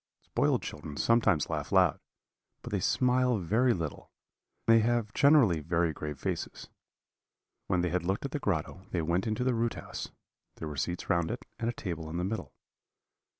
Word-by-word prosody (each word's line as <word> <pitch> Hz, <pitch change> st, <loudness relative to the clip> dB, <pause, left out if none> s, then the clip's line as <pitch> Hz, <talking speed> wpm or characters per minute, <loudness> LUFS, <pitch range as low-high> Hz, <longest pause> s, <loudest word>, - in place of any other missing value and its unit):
Spoiled -, -, +1 dB
children 75 Hz, -1 st, -7 dB
sometimes 115 Hz, -9 st, +3 dB
laugh -, -, -3 dB
loud, -, -, +4 dB, 0.6 s
but -, -, -7 dB
they -, -, +1 dB
smile 125 Hz, -1 st, +2 dB
very 110 Hz, +8 st, +2 dB
little; 80 Hz, -8 st, -4 dB, 0.6 s
they 115 Hz, 0 st, +6 dB
have 115 Hz, -1 st, +1 dB
generally 140 Hz, -, +5 dB
very 85 Hz, +1 st, 0 dB
grave 75 Hz, -2 st, -5 dB
faces. -, -, -4 dB, 1.0 s
"When 90 Hz, -1 st, +2 dB
they 90 Hz, -, 0 dB
had 90 Hz, 0 st, 0 dB
looked 95 Hz, +8 st, -1 dB
at 140 Hz, -, -4 dB
the 150 Hz, -, -2 dB
grotto, 95 Hz, -, -2 dB
they 85 Hz, -3 st, -1 dB
went 85 Hz, +6 st, 0 dB
into 110 Hz, +3 st, 0 dB
the 130 Hz, 0 st, +2 dB
root 115 Hz, 0 st, 0 dB
house; -, -, -6 dB, 0.5 s
there 80 Hz, -, -6 dB
were 75 Hz, -, -5 dB
seats 85 Hz, +5 st, -3 dB
round 85 Hz, -1 st, +1 dB
it, -, -, -5 dB
and 115 Hz, -, 0 dB
a -, -, -2 dB
table 85 Hz, -8 st, -5 dB
in 80 Hz, -, -4 dB
the 90 Hz, -, -1 dB
middle. 95 Hz, -, -3 dB
95 Hz, 180 wpm, -30 LUFS, 85-120 Hz, 1.0 s, they